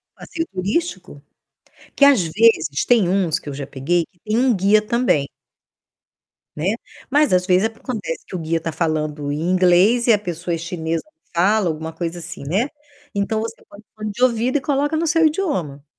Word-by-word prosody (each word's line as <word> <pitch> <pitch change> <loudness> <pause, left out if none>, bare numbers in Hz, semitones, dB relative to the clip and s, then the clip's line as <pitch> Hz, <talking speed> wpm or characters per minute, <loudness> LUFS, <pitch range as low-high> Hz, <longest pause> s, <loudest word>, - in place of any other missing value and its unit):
passeio 330 0 -5
turístico, 185 - -3 0.7
que 280 - +6
às 275 -9 +6
vezes 165 -5 +2
tem 230 -7 +4
uns 180 -4 +1
que 145 - -9
eu - - -5
já 140 0 -6
peguei, 165 +5 0
que 175 - -37
tem 215 +4 -2
um 250 -3 +3
guia 200 +3 +4
também 215 - +1 1.3
né, 180 +8 0 0.4
mas 295 -6 +3
às 180 0 +3
vezes 185 +2 +3
acontece 225 -5 -6
que - - -14
o - - -3
guia 165 0 -1
tá 165 - -3
falando 155 -3 -2
em 150 +2 -3
inglês 185 +6 +4
e 235 - +7
a - - +4
pessoa 175 -3 -4
é - - -4
chinesa, 165 -1 -3
não 320 +1 -32
fala, 195 +2 +3
alguma 160 0 -3
coisa 170 +1 -4
assim, 170 -2 -8
né. 215 - 0 0.4
Então, 210 +2 -1
você 230 0 -4
põe 200 - -14
o 215 - -16
fone 215 -1 -4
de 240 +5 -2
ouvido 250 +2 +2
e 275 - -3
coloca 290 +2 0
no 335 - 0
seu 325 +1 +3
idioma. 280 - -1
190 Hz, 190 wpm, -20 LUFS, 165-235 Hz, 1.3 s, e